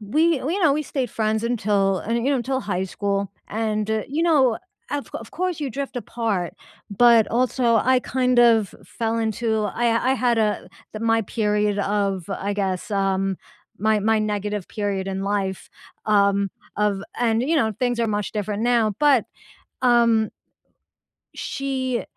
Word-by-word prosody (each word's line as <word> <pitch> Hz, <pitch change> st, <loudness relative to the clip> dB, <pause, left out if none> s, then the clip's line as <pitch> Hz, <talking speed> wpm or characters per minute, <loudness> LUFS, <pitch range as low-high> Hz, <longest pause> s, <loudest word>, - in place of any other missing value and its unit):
we 305 Hz, +9 st, +2 dB
you 335 Hz, +9 st, -2 dB
know, 305 Hz, -4 st, +5 dB
we 300 Hz, +2 st, 0 dB
stayed 260 Hz, -4 st, -3 dB
friends 220 Hz, 0 st, -1 dB
until, 200 Hz, -5 st, +1 dB
eh 225 Hz, -, -1 dB
you 235 Hz, +4 st, +1 dB
know, 280 Hz, -, +2 dB
until 260 Hz, +2 st, -1 dB
high 190 Hz, -5 st, -2 dB
school, 200 Hz, 0 st, -2 dB, 0.2 s
and, 215 Hz, -1 st, -1 dB
eh, 220 Hz, -1 st, 0 dB
you 295 Hz, +5 st, -1 dB
know, 275 Hz, -9 st, +3 dB, 0.3 s
of 290 Hz, -1 st, -3 dB
of -, -, -7 dB
course 365 Hz, -2 st, -2 dB
you 285 Hz, -3 st, -2 dB
drift 275 Hz, +1 st, -5 dB
apart, 220 Hz, -6 st, -2 dB, 0.4 s
but 230 Hz, +1 st, +5 dB
also 245 Hz, -1 st, +2 dB
I, 255 Hz, +3 st, +3 dB
kind 255 Hz, -1 st, +1 dB
of 230 Hz, -4 st, +4 dB
fell 230 Hz, -1 st, -2 dB
into 220 Hz, 0 st, 0 dB
I 235 Hz, +4 st, +1 dB
I -, -, +2 dB
had 245 Hz, -3 st, +1 dB
a 215 Hz, -1 st, 0 dB, 0.2 s
the 215 Hz, -, -6 dB
my 225 Hz, 0 st, +2 dB
period 210 Hz, -1 st, 0 dB
of, 200 Hz, -2 st, -1 dB
I 200 Hz, +1 st, -3 dB
guess 195 Hz, -1 st, -2 dB
um, 195 Hz, -1 st, 0 dB, 0.4 s
my 215 Hz, +1 st, +2 dB
my 220 Hz, +2 st, +2 dB
negative 210 Hz, -2 st, -2 dB
period 200 Hz, -2 st, -2 dB
in 195 Hz, 0 st, -3 dB
life, 195 Hz, -2 st, -2 dB, 0.4 s
um, 200 Hz, -1 st, +3 dB, 0.3 s
of 205 Hz, -2 st, 0 dB, 0.2 s
and, 230 Hz, -1 st, +2 dB
you 315 Hz, +6 st, +1 dB
know, 220 Hz, -7 st, +2 dB
things 245 Hz, -1 st, 0 dB
are 230 Hz, -, +2 dB
much 210 Hz, -1 st, -2 dB
different 210 Hz, 0 st, -2 dB
now, 235 Hz, -3 st, +2 dB
but, 285 Hz, -6 st, +4 dB, 0.6 s
um 235 Hz, -3 st, +4 dB, 1.1 s
she 260 Hz, -3 st, -2 dB
220 Hz, 160 wpm, -23 LUFS, 205-245 Hz, 1.1 s, know